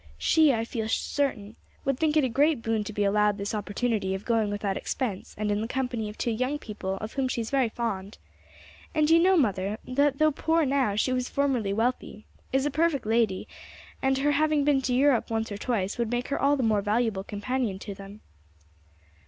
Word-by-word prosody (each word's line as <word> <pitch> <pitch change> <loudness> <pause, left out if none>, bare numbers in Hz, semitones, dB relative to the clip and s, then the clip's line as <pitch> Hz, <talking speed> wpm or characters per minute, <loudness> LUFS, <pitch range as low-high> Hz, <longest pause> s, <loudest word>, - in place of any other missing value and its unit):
She, 315 -3 +4
I 225 -2 -1
feel 225 -2 -4
certain, 230 -6 -1 0.3
would 275 -2 0
think 315 -1 +2
it 305 - +4
a - - +2
great 280 +1 +2
boon 225 -1 0
to 215 - -5
be 205 0 -1
allowed 210 0 +2
this 200 +1 -4
opportunity 205 -1 -1
of 190 +2 -7
going 225 -3 +1
without 205 -1 -2
expense 215 -5 -4
and 210 0 -1
in 205 +1 0
the 225 - -2
company 245 -4 -2
of 210 - -10
two 235 - -1
young 255 +6 -1
people 205 -7 -5
of 215 +3 -7
whom 270 -2 0
she 255 - -2
is 225 -1 -4
very 265 -4 +2
fond. 215 -4 -4 0.8
And 305 0 +3
you 330 - +7
know, 370 +2 +4
mother, 205 - 0
that 275 +2 +1
though 310 +1 +4
poor 320 +2 +1
now 265 -6 +1
she 255 +5 +1
was 250 0 -1
formerly 260 -8 0
wealthy, 225 0 -2 0.3
is 270 +1 +1
a 295 - 0
perfect 305 -3 +1
lady, 220 -4 +1 0.5
and 265 0 +2
her 290 +2 +2
having 305 0 +2
been 280 -2 +3
to 250 -1 0
Europe 270 -2 +3
once 225 -1 -2
or 205 - -4
twice 210 -4 -2
would 235 -2 0
make 245 +1 -2
her 280 - -1
all 285 +1 +3
the 260 - -1
more 215 -3 +2
valuable 210 -1 0
companion 210 +1 -2
to 200 +1 -7
them." 195 +2 -11
235 Hz, 210 wpm, -27 LUFS, 210-275 Hz, 0.8 s, you